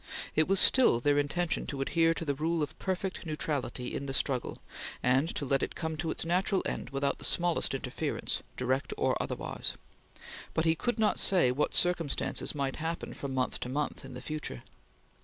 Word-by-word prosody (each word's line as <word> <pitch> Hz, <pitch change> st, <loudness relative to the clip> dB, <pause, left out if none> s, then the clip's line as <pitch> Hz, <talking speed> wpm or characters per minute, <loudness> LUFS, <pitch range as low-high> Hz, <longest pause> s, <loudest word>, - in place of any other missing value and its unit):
It 155 Hz, -, +4 dB
was 195 Hz, 0 st, +4 dB
still 250 Hz, -, +7 dB
their 145 Hz, +3 st, +3 dB
intention 160 Hz, +4 st, 0 dB
to 140 Hz, -, -4 dB
adhere 165 Hz, +4 st, +2 dB
to 165 Hz, -, -4 dB
the 145 Hz, -, +1 dB
rule 160 Hz, +3 st, 0 dB
of 145 Hz, -, -5 dB
perfect 190 Hz, 0 st, -2 dB
neutrality 145 Hz, -6 st, -3 dB
in 140 Hz, -, -3 dB
the 135 Hz, -, -2 dB
struggle, 130 Hz, -3 st, 0 dB, 0.5 s
and 130 Hz, +6 st, +3 dB
to 145 Hz, -, -1 dB
let 135 Hz, 0 st, +2 dB
it -, -, -2 dB
come 160 Hz, -1 st, -3 dB
to 160 Hz, +1 st, -2 dB
its -, -, -2 dB
natural 185 Hz, +3 st, +2 dB
end -, -, -3 dB
without 140 Hz, 0 st, -1 dB
the -, -, -10 dB
smallest 175 Hz, -1 st, +2 dB
interference, -, -, -2 dB, 0.2 s
direct 130 Hz, +3 st, 0 dB
or -, -, +2 dB
otherwise. -, -, -2 dB, 0.8 s
But 160 Hz, -, +2 dB
he 160 Hz, -, +5 dB
could 240 Hz, +9 st, -1 dB
not 215 Hz, -1 st, +2 dB
say 180 Hz, -10 st, +4 dB
what 140 Hz, +4 st, 0 dB
circumstances 170 Hz, -4 st, +1 dB
might 135 Hz, -2 st, -1 dB
happen 165 Hz, +2 st, -3 dB
from 135 Hz, -1 st, -5 dB
month 130 Hz, -1 st, 0 dB
to 125 Hz, -, -4 dB
month 145 Hz, +3 st, -2 dB
in -, -, -9 dB
the 125 Hz, -, -8 dB
future. 150 Hz, -, -5 dB
150 Hz, 190 wpm, -30 LUFS, 135-170 Hz, 0.8 s, still